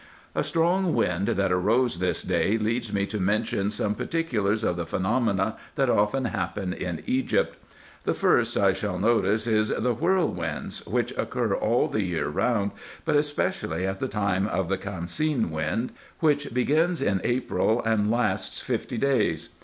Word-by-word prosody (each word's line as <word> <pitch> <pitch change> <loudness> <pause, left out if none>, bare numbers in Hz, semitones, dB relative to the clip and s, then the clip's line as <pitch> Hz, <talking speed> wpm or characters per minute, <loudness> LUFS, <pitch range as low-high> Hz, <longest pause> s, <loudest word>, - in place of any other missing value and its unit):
A - - 0
strong 175 +2 +2
wind 90 +2 +1
that 95 -1 +1
arose 110 +3 +2
this 90 0 -1
day 90 +4 +1
leads 115 +1 -1
me 100 -1 +1
to 105 +1 -4
mention 100 0 0
some 105 0 -1
particulars 110 -10 -1
of 90 - +1
the 85 -1 -4
phenomena 105 0 0 0.2
that 135 -4 +2
often 105 +6 +2
happen 100 -5 -2
in 90 -3 -4
Egypt. 130 +1 +1 0.5
The - - +1
first - - +2
I 100 -1 +4
shall 95 -1 -3
notice 110 +1 +2
is 110 -2 +2
the 125 +2 +1
whirlwinds, 120 - -1
which - - -1
occur - - 0
all - - +2
the 110 - -1
year 90 -5 -1
round, 100 +5 +1 0.3
but - - +2
especially 145 - 0
at 95 0 -2
the 130 - -1
time 100 -3 0
of 95 -4 -1
the 95 - +1
camseen 100 - -1
wind, 80 +10 -1 0.3
which 145 -3 +2
begins 155 +8 +2
in 100 -2 +1
April, 120 -2 +1
and 110 -2 +2
lasts 105 -5 0
fifty - - -3
days. 115 - +1
105 Hz, 160 wpm, -26 LUFS, 95-125 Hz, 0.5 s, I